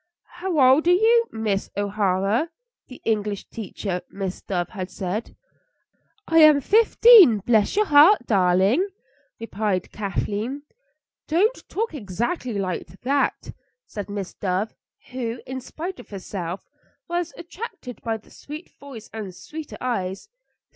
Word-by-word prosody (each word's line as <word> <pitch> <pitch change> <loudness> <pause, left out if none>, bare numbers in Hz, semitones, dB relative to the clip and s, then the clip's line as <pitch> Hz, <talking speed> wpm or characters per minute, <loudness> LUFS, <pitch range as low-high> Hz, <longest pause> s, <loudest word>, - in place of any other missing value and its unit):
"How 360 -4 -1
old 265 +5 +5
are 355 - +6
you, 460 +4 +4
Miss 215 -3 -2
O'Hara?" 205 - 0 0.4
the 255 - -12
English 210 -2 -1
teacher, 195 -4 -4
Miss 195 -2 -5
Dove, 175 -3 -2
had 185 -3 -6
said. 195 +5 -4 0.9
"I 325 0 +4
am 305 -2 +8
fifteen, 435 - +7
bless 215 - +2
your 425 +1 +3
heart, 300 0 +6
darling!" 195 - +3 0.5
replied 210 -4 -2
Kathleen. 215 +6 -3 0.6
"Don't 400 +10 +1
talk 450 -1 -2
exactly 240 - -3
like 185 -3 -3 0.2
that," 280 +3 0 0.3
said 205 -1 -7
Miss 200 -2 -5
Dove, 190 +2 -2 0.4
who, 245 -2 -4
in 260 0 -5
spite 340 +6 -6
of 245 - -13
herself, 190 -2 -6 0.4
was 345 -1 -2
attracted 340 - -8
by 225 -1 -2
the 215 - -22
sweet 300 +4 -10
voice 265 -6 -10
and 205 -5 -6
sweeter 310 +8 -8
eyes. 195 - -3
230 Hz, 125 wpm, -23 LUFS, 200-310 Hz, 0.9 s, am